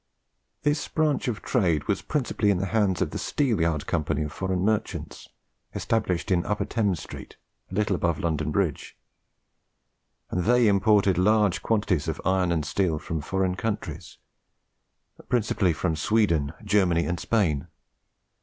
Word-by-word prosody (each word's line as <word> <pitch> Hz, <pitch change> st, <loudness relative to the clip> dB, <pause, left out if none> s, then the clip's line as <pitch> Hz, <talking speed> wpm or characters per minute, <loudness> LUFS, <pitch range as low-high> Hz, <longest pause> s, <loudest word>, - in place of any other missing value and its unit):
This 150 Hz, 0 st, +1 dB
branch 155 Hz, -4 st, 0 dB
of 115 Hz, -4 st, -3 dB
trade 85 Hz, -, +1 dB
was 100 Hz, -2 st, 0 dB
principally 125 Hz, -7 st, 0 dB
in 100 Hz, -, +3 dB
the 95 Hz, -, -1 dB
hands 100 Hz, -6 st, +2 dB
of -, -, -4 dB
the -, -, -4 dB
Steelyard 85 Hz, -, 0 dB
Company 80 Hz, -1 st, -1 dB
of 75 Hz, 0 st, -6 dB
Foreign 95 Hz, 0 st, -2 dB
Merchants, 110 Hz, 0 st, -2 dB, 0.5 s
established 100 Hz, -6 st, -1 dB
in 85 Hz, -2 st, +3 dB
Upper 105 Hz, -, -1 dB
Thames 100 Hz, -8 st, 0 dB
Street, -, -, -10 dB, 0.3 s
a 95 Hz, -, -7 dB
little 105 Hz, -1 st, +1 dB
above 85 Hz, -2 st, 0 dB
London 80 Hz, -3 st, -1 dB
Bridge; 80 Hz, -2 st, -2 dB, 1.3 s
and 90 Hz, -1 st, -1 dB
they 120 Hz, 0 st, +4 dB
imported 100 Hz, -2 st, +3 dB
large 105 Hz, 0 st, +3 dB
quantities 105 Hz, -8 st, 0 dB
of -, -, -3 dB
iron 95 Hz, -1 st, +2 dB
and 80 Hz, -3 st, 0 dB
steel 80 Hz, +1 st, 0 dB
from 80 Hz, +1 st, -4 dB
foreign 95 Hz, +3 st, 0 dB
countries, 95 Hz, -5 st, -4 dB, 1.1 s
principally 110 Hz, -6 st, +2 dB
from 80 Hz, +1 st, -1 dB
Sweden, 80 Hz, -5 st, +1 dB
Germany, 90 Hz, -5 st, +2 dB
and 85 Hz, -1 st, -2 dB
Spain. 85 Hz, -10 st, 0 dB
95 Hz, 145 wpm, -26 LUFS, 85-105 Hz, 1.3 s, they